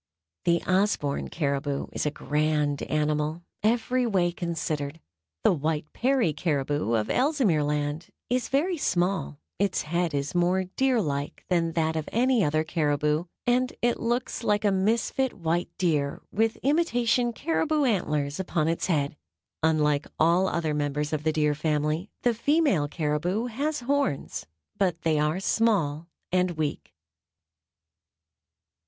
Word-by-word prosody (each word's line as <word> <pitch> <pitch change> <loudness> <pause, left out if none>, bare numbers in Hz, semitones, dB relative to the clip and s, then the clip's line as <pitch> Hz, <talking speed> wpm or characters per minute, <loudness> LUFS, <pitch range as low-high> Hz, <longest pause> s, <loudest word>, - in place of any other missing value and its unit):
The 170 -1 +2
Osborn 185 -7 +1
caribou 140 -2 -1
is - - -2
a - - +3
grand 150 -1 0
animal, 150 +2 -1 0.2
every 240 +3 +1
way 180 -5 +2
considered. 160 -3 -3 0.4
The - - +5
white 155 -1 -2
Peary 250 - +2
caribou, 145 -5 -1
of 110 -1 +1
Ellesmere 255 - +2
Land, 150 +2 -2 0.2
is 250 +1 -1
very 335 +6 +1
small, 175 - 0 0.2
its 200 0 +1
head 170 0 -1
is 140 0 -2
more 180 +2 +2
deer 250 +7 +1
like 145 -6 -3
than 165 -2 +1
that 160 -1 0
of 155 -1 -3
any 245 -1 +3
other 155 0 +1
caribou, 150 0 0 0.2
and 250 +1 +2
it 240 0 +2
looks 240 +1 -1
like 210 -1 +1
a 205 - +4
misfit 225 +6 +1
white 170 0 -1
deer 150 -6 0
with 225 +2 +1
imitation 245 -5 +2
caribou 310 +3 0
antlers 150 - 0
upon 170 -4 0
its 165 0 0
head. 150 -4 0 0.5
Unlike 150 -2 +2
all 170 +4 +4
other 165 -4 -1
members 150 +1 -1
of 155 - 0
the 160 - +2
Deer 150 -1 +2
Family, 150 +4 -1
the 240 - +3
female 275 - +2
caribou 160 +8 -1
has 285 +5 -2
horns; 275 - -1 0.3
but 180 -4 0
they 155 -2 +2
are 150 +4 +1
small 180 -8 +1 0.2
and 180 -2 +1
weak. 150 -2 -3
170 Hz, 135 wpm, -27 LUFS, 150-225 Hz, 0.5 s, The